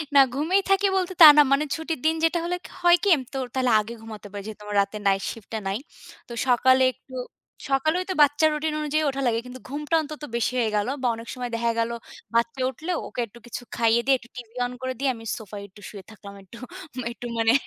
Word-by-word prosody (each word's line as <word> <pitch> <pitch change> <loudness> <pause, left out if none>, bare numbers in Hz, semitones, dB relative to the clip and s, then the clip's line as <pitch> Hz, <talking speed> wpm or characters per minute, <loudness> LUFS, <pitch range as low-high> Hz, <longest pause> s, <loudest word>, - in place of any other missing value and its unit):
না, - - +9 0.2
ঘুমিয়েই 350 +8 +2
থাকি 390 +1 +4
বলতে 370 -1 0
তা 320 - +14
না। - - +10
মানে 275 +2 +4
ছুটির 320 -2 -4
দিন 320 +1 +3
যেটা 330 +1 +2
হলে 355 +1 -1
ক - - -7
হয় 350 0 +7
কি? - - 0
আমি 265 - -5
তো - - -3 0.2
তাহলে 255 -2 +2
আগে 215 +2 -5
ঘুমাতে 215 -2 -9
পারি। 205 0 -6
যেহেতু 215 -1 -9
আমার 210 0 -5
রাতে 200 +2 -3
Night 195 0 +2
shift 225 -3 -12
টা 220 - -1
নাই, 195 +1 -1 0.5
তো 240 - -8
সকালে 260 +1 +4
একটু 260 - -20 0.6
সকালে 275 +4 +2
ওই - - -5
তো - - +1
বাচ্চার 290 +2 +3
Routine 305 +1 -2
অনুযায়ী 305 +1 0
ওঠা 275 0 -3
লাগে। 230 -1 +1
কিন্তু 250 +1 -9
ঘুমটা 295 +3 -2
অন্তত 305 0 -8
বেশি 235 +1 0
হয়ে 225 -2 +1
গেল। 205 +1 +1
বা 255 - +1
অনেক 230 +1 -10
সময় 250 -1 -5
দেখা 235 0 +1
গেল, 230 +1 0 0.4
বাচ্চা 235 +3 +1
উঠলেও 330 +6 -3
ওকে - - -8
একটু 230 +4 -16
কিছু 240 0 -6
খাইয়ে 230 0 +3
দিয়ে 270 0 +5
একটু 240 -1 -18
TV 240 -2 -8 0.2
on 245 - -4
করে 260 0 -2
দিয়ে 275 0 +1
আমি 225 - -11
সোফায় 205 -2 -8
একটু 205 +2 -18
শুয়ে 200 -2 -10
থাকলাম। 205 -2 -12
একটু, 195 +5 -14 0.5
একটু 240 - -9
মানে 225 0 +4
250 Hz, 235 wpm, -25 LUFS, 225-300 Hz, 0.6 s, তা